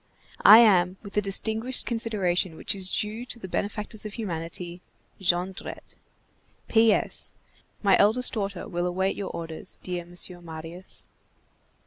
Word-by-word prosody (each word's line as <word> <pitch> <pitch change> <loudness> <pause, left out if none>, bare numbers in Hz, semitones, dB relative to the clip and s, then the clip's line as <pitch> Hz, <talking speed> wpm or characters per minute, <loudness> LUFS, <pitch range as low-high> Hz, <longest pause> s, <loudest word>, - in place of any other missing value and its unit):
I 215 - +11
am 190 -5 +5
with 200 -1 -10
the 210 - +2
distinguished 220 +5 +2
consideration 195 -7 -1
which - - -2
is 190 -2 0
due 215 +4 -1
to 245 - -2
the 190 - -8
benefactors 210 +3 -3
of 215 -1 -7
humanity,— 175 -3 -5 0.4
JONDRETTE. 185 0 -2 0.7
P.S. 225 -2 +2 0.5
My 195 -2 +5
eldest 225 +5 +3
daughter 200 -5 -3
will 175 -4 -2
await 190 +2 -1
your 200 - -5
orders, 165 -1 -5
dear 180 -1 -4
Monsieur 175 +1 -3
Marius. 165 +2 -9
190 Hz, 130 wpm, -26 LUFS, 175-215 Hz, 0.7 s, I